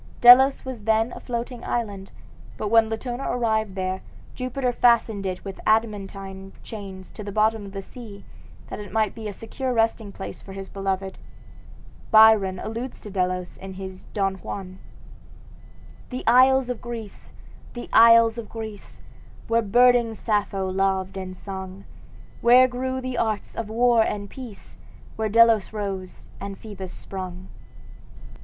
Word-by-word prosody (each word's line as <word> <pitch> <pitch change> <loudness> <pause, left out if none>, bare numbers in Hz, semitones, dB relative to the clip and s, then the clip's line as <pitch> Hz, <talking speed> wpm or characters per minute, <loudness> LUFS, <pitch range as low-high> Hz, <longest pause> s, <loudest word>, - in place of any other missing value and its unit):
Delos 265 +3 +8
was 245 -6 -7
then 225 +1 +2
a - - -8
floating 240 0 -5
island; 200 -5 -3 0.5
but 210 - -3
when 225 0 +5
Latona 240 +3 -4
arrived 220 -4 0
there, 185 0 -2 0.3
Jupiter 255 0 -2
fastened 225 -5 +3
it 185 +1 -5
with 195 -1 -7
adamantine 195 -3 -1
chains 195 -4 -9
to 210 - -9
the 205 - -6
bottom 215 0 +1
of - - -10
the 195 0 -6
sea, 210 -3 -11 0.5
that - - -5
it 205 -2 -8
might 215 -1 +1
be 220 -2 -7
a - - -4
secure 255 +6 -4
resting 225 -3 0
place 195 - -8
for 195 - -11
his 195 0 -8
beloved. 195 -1 -3 0.9
Byron 215 -4 +6
alludes 230 +6 -5
to 210 - -9
Delos 180 -1 -2
in 190 0 -8
his 190 0 -9
"Don 195 -2 -1
Juan": 185 0 -7 1.3
"The 255 0 -5
isles 255 +1 +5
of 245 - -6
Greece! 230 -4 -8 0.4
the 240 - -6
isles 230 0 +7
of 225 - -8
Greece! 220 -3 -8 0.5
Where 230 0 +2
burning 240 +1 +4
Sappho 205 -3 -1
loved 190 0 0
and 185 -1 -6
sung, 190 0 -8 0.6
Where 250 +2 +7
grew 260 +1 -3
the 255 -1 -3
arts 215 -2 -2
of 225 -2 -4
war 235 +1 +4
and 205 -2 -2
peace, 245 -6 -11 0.4
Where 220 -1 -1
Delos 230 -1 +5
rose 195 -3 -6
and 200 0 -6
Phoebus 195 -4 -8
sprung!" 185 -1 -7
215 Hz, 150 wpm, -24 LUFS, 195-235 Hz, 1.3 s, Delos